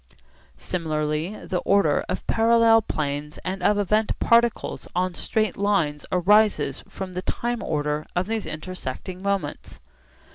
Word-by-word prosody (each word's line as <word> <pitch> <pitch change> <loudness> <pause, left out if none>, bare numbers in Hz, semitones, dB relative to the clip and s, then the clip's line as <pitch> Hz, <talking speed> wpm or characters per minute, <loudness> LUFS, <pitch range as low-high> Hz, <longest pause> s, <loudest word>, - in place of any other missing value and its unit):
Similarly 155 - -2
the 180 - -1
order 195 -6 +2
of - - -3
parallel 230 0 +5
planes 150 -4 -3
and 185 +1 -3
of 205 +3 +3
event 210 +2 +1
particles 235 -1 +2
on 180 0 0
straight 215 +2 -1
lines 195 -8 0
arises 185 -6 +3
from 190 -1 -6
the 180 - -3
time 240 +5 -2
order 150 0 -2
of 180 +1 +1
these 220 +1 -3
intersecting 180 +2 -6
moments. 195 -7 -3
185 Hz, 130 wpm, -24 LUFS, 155-210 Hz, -, parallel